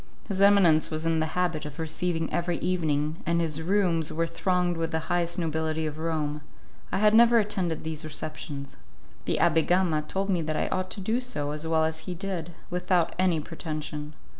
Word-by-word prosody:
His 195 -2 -2
eminence 195 -6 +6
was 155 0 -3
in 165 -1 +2
the 155 - +1
habit 175 -4 0
of 150 -1 -7
receiving 165 0 -2
every 175 -1 0
evening, 155 -4 0
and 170 0 +1
his 160 -2 -1
rooms 175 -3 +1
were 165 +1 0
thronged 180 +1 0
with 165 0 -1
the 160 - -1
highest 175 0 +1
nobility 160 -1 -1
of 155 0 -4
Rome; 155 -2 -2 0.5
I - - 0
had 210 +1 +4
never 235 +1 +7
attended 190 -6 0
these 160 0 -4
receptions. 150 -2 -6 0.5
The - - +1
Abbé 165 -1 +3
Gama 175 -4 +3
told 190 +6 -3
me 175 -3 +1
that 155 -1 -2
I - - 0
ought 185 0 -1
to 200 - -4
do 220 +6 0
so 150 - -3
as 150 +2 -3
well 160 -1 +2
as 160 0 -2
he 180 - -3
did, 175 -2 -4 0.2
without 180 -1 +1
any 180 -3 +3
pretension. 155 -1 -6
165 Hz, 190 wpm, -27 LUFS, 155-180 Hz, 0.5 s, never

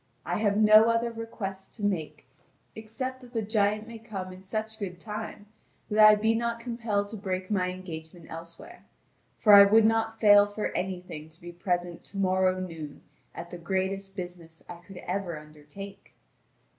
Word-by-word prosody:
I - - -1
have 205 -2 +2
no 215 0 +7
other 230 +1 +1
request 205 -4 -6
to 215 - -9
make, 175 -9 -2 0.5
except 255 +4 -5
that 245 -1 -15
the 225 -2 -1
giant 210 0 +1
may 230 -1 -9
come 195 -5 -6
in 185 +1 -13
such 220 +3 -4
good 180 -4 -5
time 210 -1 -6 0.5
that 210 - +1
I 215 0 +9
be 220 +2 +2
not 235 0 -1
compelled 230 -4 -2
to 220 - -6
break 185 -1 -4
my 185 -3 +1
engagement 170 -2 -8
elsewhere; 170 - -10 0.5
for 210 - +5
I 200 0 +12
would 215 +2 +5
not 225 0 +1
fail 205 -1 +7
for 205 +1 -3
anything 180 -4 -4
to 160 +1 -19
be 175 0 -9
present 175 0 -2
to 200 - -10
morrow 185 -1 +2
noon 165 -5 -7 0.3
at 170 +1 -8
the 175 - -7
greatest 195 +2 -2
business 175 -3 -8
I 175 - -8
could 180 +2 -13
ever 180 -3 -3
undertake." 150 +6 -12
200 Hz, 170 wpm, -28 LUFS, 180-220 Hz, 0.5 s, I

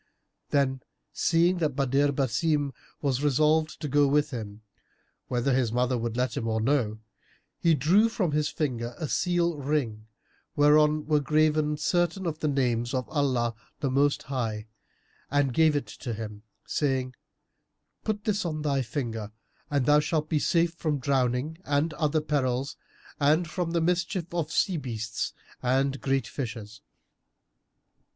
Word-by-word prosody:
Then, 135 -2 +1 0.3
seeing 175 +2 +2
that 150 -5 0
Badr 140 +1 +2
Basim 140 +2 0 0.3
was 135 -1 0
resolved 155 +2 +2
to 150 - -2
go 145 +1 +4
with 145 +1 +2
him, 110 -3 -7 0.6
whether 125 +2 0
his 125 -3 +1
mother 125 +2 +1
would 115 -1 -3
let 125 +1 0
him 120 -5 -2
or 110 0 0
no, 110 -3 +1 0.6
he 165 -2 +4
drew 180 - +4
from 200 -8 -1
his 150 0 +1
finger 120 -5 -3
a 155 - -3
seal 170 0 +1
ring, 130 -7 -2 0.5
whereon 150 +1 +4
were 150 0 +3
graven 150 +1 +2
certain 175 +4 0
of 160 -2 -2
the 155 - 0
names 120 -4 0
of 130 -1 -2
Allah 130 -6 +1 0.3
the 135 - -1
Most 140 +2 +2
High, 115 -6 -3 0.6
and 140 -2 +1
gave 160 +2 +4
it 145 - 0
to 115 +2 -6
him, 105 -1 -7 0.2
saying, 130 -3 -1 0.9
"Put 210 -1 -2
this 210 -2 0
on 155 -3 -3
thy 140 -2 +1
finger, 115 -4 -4 0.4
and 140 -4 +1
thou 150 0 +6
shalt 155 0 -1
be 155 - +2
safe 170 +2 +2
from 155 -3 -1
drowning 130 +3 0
and 145 +3 0
other 155 0 0
perils 135 -2 -1 0.4
and 155 +4 +3
from 175 +1 -2
the 170 0 0
mischief 175 +1 -1
of 160 -3 -2
sea 180 +1 +1
beasts 115 -6 -4 0.3
and 135 +2 +1
great 135 -1 +1
fishes." 110 -5 -6
145 Hz, 150 wpm, -27 LUFS, 125-155 Hz, 0.9 s, thou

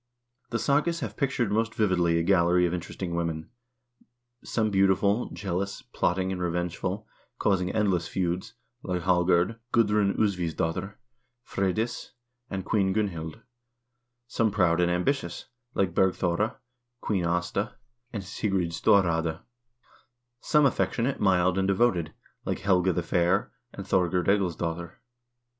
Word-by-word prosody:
The 115 - -1
sagas 150 +7 +1
have - - -4
pictured 130 -6 0
most 115 +2 0
vividly 90 -5 +2
a 85 - +1
gallery 90 -1 +4
of 85 - -1
interesting 85 0 -4
women; 85 -2 -3 0.9
some 110 -2 0
beautiful, 100 +3 +2
jealous, 100 0 -3
plotting, 95 +1 -1
and 90 -1 -3
revengeful, 90 +3 -2 0.3
causing 90 -3 +1
endless 100 -6 +1
feuds, 95 +5 -2 0.3
like 90 -5 -3
Hallgerd, 90 +3 +2
Gudrun 105 -3 +3
Usvivs 90 -6 0
dotter, 95 +5 -2 0.5
Freydis, 110 +5 -2 0.4
and 95 -1 -4
Queen 95 -3 +1
Gunhild; 95 -3 -3 0.8
some 115 -1 +1
proud 90 -4 +2
and 90 - +3
ambitious, 90 +1 -1 0.3
like 95 -3 +1
Bergthora, 95 +2 +1 0.5
Queen 95 -4 0
Aasta, 90 +5 -1 0.4
and 105 -4 -4
Sigrid 95 -3 -1
Storraade; 85 -3 +2 1.0
some 150 +2 +3
affection 120 -3 +1
ate, 135 +1 -1
mild, 95 -1 +3
and 95 - +1
devoted, 95 -5 +2 0.3
like - - -3
Helga 95 -1 +3
the 90 0 -1
Fair 90 +3 +1 0.2
and - - -8
Thorgerd 90 -1 +1
Egilsdotter. 85 -3 0
95 Hz, 125 wpm, -27 LUFS, 85-105 Hz, 1.0 s, gallery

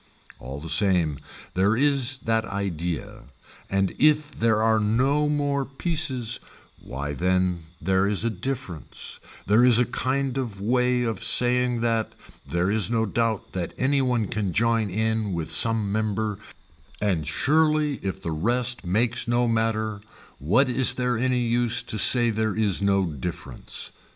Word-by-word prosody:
All 70 +2 -8
the 80 - -9
same 80 -3 +2 0.3
there 100 +4 +2
is 135 -2 +3
that 115 0 +1
idea 90 -5 -5 0.4
and 95 -1 0
if 150 0 +3
there 110 -1 +1
are 110 0 +3
no 130 +8 +1
more 145 -1 0
pieces 135 -5 -2 0.4
why 70 +2 -5
then 90 0 0
there 95 +3 +1
is 105 +2 -1
a 115 - 0
difference, 110 - -5 0.3
there 105 +4 +4
is 125 -2 +6
a 125 - +3
kind 135 +2 -2
of 115 -7 -5
way 125 +3 +1
of 115 -5 -3
saying 125 -1 +3
that, 115 -2 -1 0.4
there 90 +3 0
is 110 0 +2
no 115 -1 +1
doubt 110 0 -2
that 90 -2 -4
any 135 +1 +1
one 125 -4 0
can 100 -4 -3
join 115 0 +1
in 110 0 -1
with 85 -2 -4
some 115 -3 +2
member 110 -1 -2 0.6
and 90 -7 -1
surely 150 - +1
if 95 0 -5
the 85 - -3
rest 120 +9 0
makes 115 +8 0
no 120 0 +1
matter 110 -2 -1 0.4
what 110 - +2
is 130 0 +2
there 125 -1 -1
any 125 +2 0
use 120 0 +2
to 110 - -1
say 120 +2 +6
there 110 -1 -1
is 105 -3 +1
no 100 -1 +2
difference. 80 -3 -7
110 Hz, 150 wpm, -24 LUFS, 95-125 Hz, 0.6 s, is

